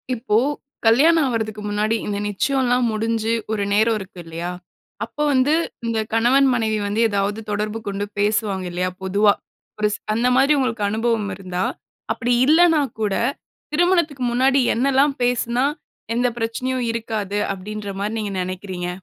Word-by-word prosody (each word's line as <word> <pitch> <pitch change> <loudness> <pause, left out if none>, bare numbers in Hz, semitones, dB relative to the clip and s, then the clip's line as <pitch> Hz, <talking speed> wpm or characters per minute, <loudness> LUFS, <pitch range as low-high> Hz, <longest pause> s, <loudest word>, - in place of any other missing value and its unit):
இப்போ 225 -2 0 0.5
கல்யாணம் 295 +8 +5
ஆவரதக்கு 220 -3 -2
முன்னாடி 210 +2 +1
இந்த 205 -1 -2
நிச்சயம்லாம் 250 +4 +1
முடிஞ்சு 225 +1 0 0.2
ஒரு 210 -2 0
நேரம் 220 +2 +3
இருக்கு 190 -2 -10
இல்லையா? 165 +2 -5 0.5
அப்போ 290 +6 -4
வந்து 265 +3 +3 0.3
இந்த 230 -1 0
கணவன் 250 +5 +4
மனைவி 220 -3 0
வந்து 210 +3 0
ஏதாவது 200 +1 -1
தொடர்பு 210 +2 -2
கொண்டு 200 0 -2
பேசுவாங்க 205 -2 0
இல்லையா? 180 +1 -1
பொதுவா. 200 +2 +3 0.5
ஒரு 210 0 +2
ச - - -8 0.2
அந்த 235 +3 +1
மாரி 270 +3 +4
உங்களுக்கு 230 -5 -1
அனுபவம் 220 -1 0
இருந்தா, 185 -1 -3 0.5
அப்டி 245 +1 0
இல்லனா 320 +1 +5 0.2
கூட 210 -2 +1 0.6
திருமணத்துக்கு 335 -5 +2
முன்னாடி 265 +3 +3
என்னெல்லாம் 275 +3 +3
பேசுனா 245 +1 +1 0.5
எந்த 245 +1 +2
பிரச்சனையும் 250 +2 -2
இருக்காது? 220 -3 -3 0.2
அப்டின்ற 205 +2 -6
மாதிரி 210 +3 -2
நீங்க 210 -2 -3
நினைக்கிறீங்க? 185 -1 -5
225 Hz, 140 wpm, -21 LUFS, 205-250 Hz, 0.6 s, கல்யாணம்